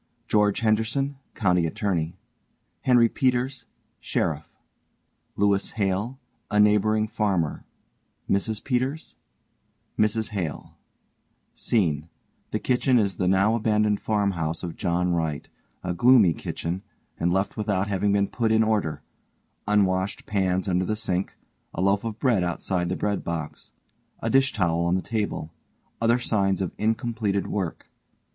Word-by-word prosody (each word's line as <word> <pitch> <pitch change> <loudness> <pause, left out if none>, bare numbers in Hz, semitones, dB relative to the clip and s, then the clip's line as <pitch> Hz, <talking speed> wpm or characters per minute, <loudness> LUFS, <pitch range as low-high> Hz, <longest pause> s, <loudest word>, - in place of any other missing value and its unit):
GEORGE 105 -1 +2
HENDERSON 115 +6 +1 0.2
(County 90 -5 +2
Attorney) 85 -1 -2 0.6
HENRY 120 -2 +5
PETERS 125 0 0 0.3
(Sheriff) - - -2 0.9
LEWIS 100 -1 +1
HALE, 105 +5 -1 0.3
A 105 0 +1
neighboring 105 +1 +4
farmer 100 -8 -1 0.6
MRS 105 +2 0
PETERS 135 +4 -2 0.8
MRS 110 +1 +1
HALE 90 -8 -5 0.8
SCENE: 80 - 0 0.4
The - - -1
kitchen 125 0 +2
is 100 -5 +1
the 90 - 0
now 95 +4 +3
abandoned 105 -2 +2
farmhouse 95 -7 -1
of 85 -2 -5
JOHN 90 +1 0
WRIGHT, 80 -3 -2 0.3
_a 90 -1 -2
gloomy 115 -5 +6
kitchen, 85 +4 -4 0.4
and 85 +1 +1
left 95 +2 0
without 105 -2 0
having 100 0 +1
been 100 0 +2
put 115 0 0
in 110 0 +4
order 105 -8 0 0.6
unwashed 95 -2 +1
pans 95 -2 0
under 90 -1 +1
the 110 +4 -1
sink, 95 -4 -2 0.4
a - - -2
loaf 100 +2 +2
of 110 -2 -4
bread 115 -9 +2
outside 90 0 -1
the 90 - -1
bread 105 -1 -1
box, 80 -3 -5 0.5
a - - -2
dish 135 +1 +4
towel 85 -4 +1
on 85 +1 +2
the 95 - -1
table 105 -8 -3 0.5
other 115 +1 +4
signs 100 -5 +1
of 95 -3 -2
incompleted 110 -2 0
work. 95 -5 -4
100 Hz, 130 wpm, -25 LUFS, 90-110 Hz, 0.9 s, gloomy